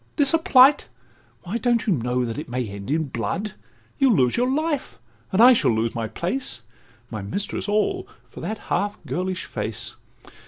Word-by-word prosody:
this 285 -1 +3
a 330 - +4
plight? 270 -2 +6 0.6
Why, 200 +6 -3
don't 240 -2 +1
you 210 - +3
know 125 -2 0
that 115 +3 -4
it 150 - -7
may 125 -1 -2
end 100 0 -8
in 160 +3 +1
blood? 130 - -3 0.5
You'll 265 -5 +5
lose 125 -5 +3
your 250 +1 +1
life, 285 - -1 0.3
and 190 - 0
I 250 +3 +9
shall 235 - +2
lose 115 0 0
my 115 -1 -2
place, 170 - -3 0.5
My 110 -2 -4
mistress 195 - -3
all, 375 - 0 0.2
for - - -12
that 220 - -4 0.2
half 205 +3 0
girlish 185 +1 -3
face. - - -4
190 Hz, 180 wpm, -23 LUFS, -, 0.6 s, I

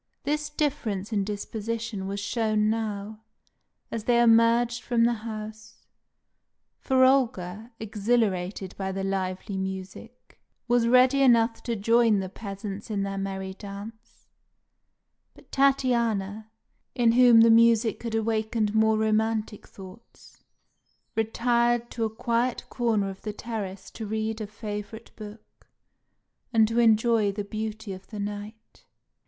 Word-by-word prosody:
This 300 +1 -1
difference 225 -9 -2
in 200 -2 +1
disposition 215 0 -4
was 200 +1 -3
shown 215 0 0
now, 215 -1 -4 0.7
as 225 -2 -4
they 240 -1 +3
emerged 235 +1 +4
from 235 -1 +1
the 240 +1 +3
house; 220 -1 -8 0.9
for 260 -1 +3
Olga, 225 -6 +1
exhilarated 205 -4 -1
by 190 0 -2
the 195 0 -4
lively 195 +1 -3
music, 190 +5 -7 0.3
was 240 -1 +3
ready 255 +3 +5
enough 230 -3 +4
to 235 - -3
join 225 0 +3
the 190 -1 -4
peasants 200 +1 -7
in 205 -2 -1
their 195 0 -3
merry 190 -1 -4
dance, 210 +3 -11 1.1
but - - -20
Tatiana, 235 -6 +1 0.5
in 235 -2 +4
whom 240 -1 +7
the 230 0 +6
music 230 -1 +4
had 230 -1 -3
awakened 220 -1 0
more 220 0 +3
romantic 220 0 0
thoughts, 190 +4 -15 0.7
retired 235 +1 +1
to 230 -1 -2
a - - -1
quiet 235 +2 -1
corner 220 -5 0
of 190 - -13
the 210 - -5
terrace 205 -4 -6
to 220 - -7
read 220 +1 -3
a 215 - -4
favourite 210 0 -7
book, 215 0 -13 0.8
and 225 -2 +4
to 230 +2 0
enjoy 225 -2 +3
the 205 +1 -4
beauty 215 0 -5
of 190 0 -11
the 215 - -9
night. 205 +2 -7
220 Hz, 130 wpm, -26 LUFS, 205-235 Hz, 1.1 s, whom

